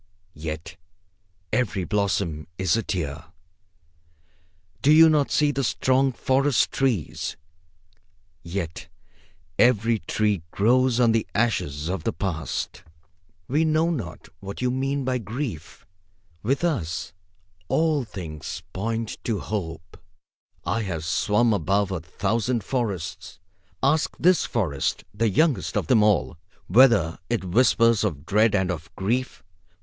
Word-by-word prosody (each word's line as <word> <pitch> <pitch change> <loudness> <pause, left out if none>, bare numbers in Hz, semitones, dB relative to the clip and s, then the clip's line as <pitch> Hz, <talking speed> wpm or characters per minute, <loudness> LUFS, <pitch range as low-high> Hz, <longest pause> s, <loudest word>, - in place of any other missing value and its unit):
Yet 80 +2 -6 0.8
every 105 -6 0
blossom 95 -6 -1
is 95 0 +2
a 115 - +1
tear. 80 -7 -4 1.6
Do 145 - +4
you 160 +1 +8
not 150 -2 +2
see 150 -1 +2
the 135 -1 -2
strong 130 +2 +2
forest 135 +1 +2
trees? 125 - -1 1.0
Yet 85 -2 -5 0.7
every 115 -2 +4
tree 105 +1 0
grows 125 +6 +2
on 120 -2 +5
the 115 0 +1
ashes 85 -10 0
of 95 +2 -3
the 115 - -1
past. 85 -5 -3 0.7
We 150 +5 +2
know 160 +1 +2
not 110 - -5
what 100 +1 -7
you 125 0 0
mean 135 +1 -1
by 130 -1 0
grief. 110 - -6 0.6
With 135 +8 0
us, 85 - -2 0.5
all 155 - +2
things 80 -9 -7
point 115 +3 -3
to 115 -3 0
Hope. 85 -4 -5 0.7
I 115 - 0
have 85 -6 -4
swum 105 +6 +2
above 100 +2 +1
a 95 - -2
thousand 110 +7 -1
forests. 95 -7 -4 0.4
Ask 155 +4 +2
this 180 -2 +4
forest, 80 - -1
the 110 +2 +1
youngest 130 - +1
of - - 0
them 125 -5 +4
all, 105 -6 +2 0.3
whether 105 -6 +4
it 120 -4 0
whispers 115 +3 +3
of 80 -8 -2
dread 105 +5 +3
and 95 -2 +1
of 80 -2 -6
grief. 120 +7 -2
105 Hz, 125 wpm, -24 LUFS, 90-130 Hz, 1.6 s, you